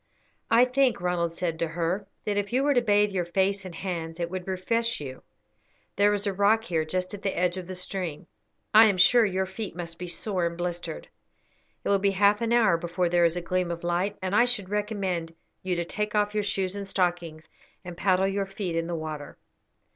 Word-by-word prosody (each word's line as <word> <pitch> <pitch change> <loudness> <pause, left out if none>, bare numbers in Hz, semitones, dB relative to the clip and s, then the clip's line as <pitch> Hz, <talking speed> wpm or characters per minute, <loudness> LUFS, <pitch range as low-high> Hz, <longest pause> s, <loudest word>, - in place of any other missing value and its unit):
"I 235 +2 +6
think," 255 -2 +2
Ronald 175 -1 0
said 165 -1 -3
to 165 - 0
her, 175 +4 -2 0.2
"that 210 - 0
if 205 +1 -1
you 260 +3 +2
were 290 0 +3
to 245 - +3
bathe 205 -2 +3
your 185 -2 0
face 195 +2 0
and 180 -2 -8
hands 165 -2 -4
it 170 0 -2
would 185 -1 -5
refresh 230 +5 0
you. 130 -3 -7 0.7
There 205 +1 +4
is 205 +1 -3
a 200 - 0
rock 205 +3 +3
here 165 -8 0
just 185 +4 -2
at 205 - -7
the 195 - -2
edge 180 0 +1
of 185 -2 -6
the 185 - -5
stream, 180 -3 -4 0.5
I 220 +1 +9
am 200 -4 +2
sure 230 +6 +6
your 190 -2 0
feet 190 0 -6
must 170 -1 -6
be 180 - -5
sore 180 0 -1
and 170 0 -6
blistered. 175 -2 -4 0.8
It - - -2
will 200 -1 +4
be 200 +1 +3
half 205 +2 +4
an 230 0 0
hour 220 -8 +4
before 175 +1 -1
there 175 0 +4
is 170 +1 +1
a - - -2
gleam 180 +1 -1
of 170 0 -5
light, 180 +4 0
and 190 +2 0
I 240 - +6
should 215 -7 -1
recommend 195 -6 -2 0.3
you 185 -1 -1
to 170 0 -2
take 210 +4 -3
off 210 0 +2
your 210 - +1
shoes 195 -2 -1
and 200 -1 -5
stockings 175 -4 -1 0.4
and 175 -1 -7
paddle 190 +1 +2
your 195 0 -1
feet 195 -3 -4
in 165 0 -1
the 175 - -2
water." 155 -2 -6
185 Hz, 220 wpm, -27 LUFS, 175-205 Hz, 0.8 s, I